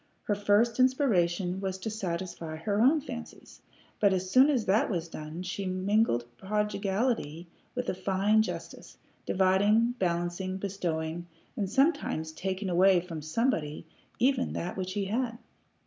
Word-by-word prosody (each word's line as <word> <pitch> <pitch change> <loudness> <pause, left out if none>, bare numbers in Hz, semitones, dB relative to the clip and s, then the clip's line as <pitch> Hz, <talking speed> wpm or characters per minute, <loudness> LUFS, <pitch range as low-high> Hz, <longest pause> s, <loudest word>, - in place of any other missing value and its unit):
Her 210 - 0
first 205 +4 +2
inspiration 190 - +2
was 190 -1 -2
to 200 +4 -4
satisfy 175 -5 -4
her 200 +6 -1
own 290 +6 +5
fancies, 240 -4 -9 0.4
but 200 -2 +4
as 185 0 -2
soon 260 +5 +6
as 250 -7 +1
that 200 +4 +2
was 170 -5 -2
done 155 +2 -7
she 190 +1 -4
mingled 185 - +1
prodigality 200 - -1 0.3
with 250 0 -2
a - - 0
fine 195 +3 +2
justice, 220 - -6 0.3
dividing, 205 +5 +3
balancing, 175 +1 -1
bestowing, 175 -4 -3 0.3
and 200 -3 -2
sometimes 265 - +1
taking 190 +4 -3
away 185 +1 +5
from 170 -3 -7
somebody 155 - -1 0.3
even 255 +1 +1
that 175 - -4
which 185 -1 -4
he 200 -1 -1
had. 230 +3 -1
190 Hz, 140 wpm, -29 LUFS, 175-220 Hz, 0.4 s, soon